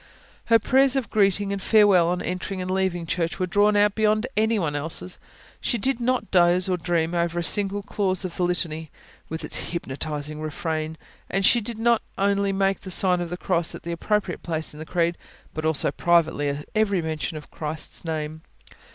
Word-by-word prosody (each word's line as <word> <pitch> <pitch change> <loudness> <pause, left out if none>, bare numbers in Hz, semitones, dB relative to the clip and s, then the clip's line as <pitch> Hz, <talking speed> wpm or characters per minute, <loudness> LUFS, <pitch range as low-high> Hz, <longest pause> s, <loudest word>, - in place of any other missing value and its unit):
Her 230 - +5
prayers 265 +4 +3
of 265 -4 -2
greeting 200 -1 +2
and 200 - -4
farewell, 200 -5 +5
on 180 +1 -1
entering 185 +1 -4
and 185 0 -3
leaving 185 -3 0
church, 165 0 -2
were 185 - 0
drawn 205 +3 +3
out 205 0 +4
beyond 215 +1 +2
anyone 210 -9 +1
else's; 160 +4 -2 0.4
she 240 - -1
did 260 +3 0
not 250 -2 0
doze 180 0 +4
or 185 - +1
dream 170 -1 -1
over 170 0 0
a 175 - 0
single 200 +2 +2
clause 190 -3 -1
of 175 - -6
the - - -4
Litany, 165 -3 0 0.4
with 160 +1 -5
its - - 0
hypnotising 150 -1 -4
refrain; 155 0 -3 0.3
and 195 +1 +1
she 240 +4 +5 0.2
not 235 0 +3 0.2
only 200 0 +1
made 195 0 +1
the 190 - -8
sign 180 -1 +3
of 175 - -4
the 180 - -4
Cross 175 -3 0
at - - -10
the 170 - -4
appropriate 195 +1 -1
place 160 -2 -3
in 150 - -11
the 155 - -8
Creed, 170 -1 0 0.3
but 155 0 -4
also 160 -3 +2
privately 160 -3 +2
at 140 +1 -5
every 200 -5 +1
mention 155 -1 -3
of 150 - -11
Christ's 155 0 -2
name. 155 -1 -4
180 Hz, 190 wpm, -24 LUFS, 160-200 Hz, 0.4 s, Her